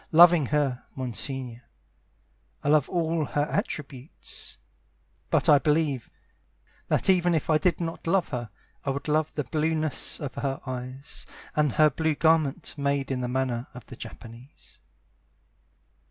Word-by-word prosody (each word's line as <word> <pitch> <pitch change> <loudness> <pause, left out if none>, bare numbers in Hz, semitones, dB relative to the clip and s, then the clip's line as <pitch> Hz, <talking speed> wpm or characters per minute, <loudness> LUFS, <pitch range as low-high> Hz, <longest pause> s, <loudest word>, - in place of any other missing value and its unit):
Loving 170 -3 +7
her, 140 -4 0
Monsignore, 130 -1 -2 1.0
I - - 0
love 150 -2 +4
all 165 -2 0
her 145 - 0
attributes; 150 - -5 0.7
But - - +2
I 145 - +7
believe 150 -4 +1 0.8
That - - +2
even 175 -2 +4
if 160 +1 0
I 155 - +4
did 170 +2 +1
not 165 -1 -4
love 185 +1 +2
her 120 -4 -4 0.3
I - - -2
would 140 +2 -3
love 155 0 +1
the 150 - -1
blueness 155 +2 -1
of 145 -3 -5
her 135 -1 -2
eyes, 130 +2 -6 0.3
And 150 -3 +2
her 155 -1 +5
blue 160 +2 0
garment, 160 0 +2
made 140 -1 0
in 130 -1 -1
the 125 - -1
manner 125 -1 -1
of 125 - -10
the 125 - -10
Japanese. 120 +3 -12
145 Hz, 140 wpm, -27 LUFS, 130-160 Hz, 1.0 s, Loving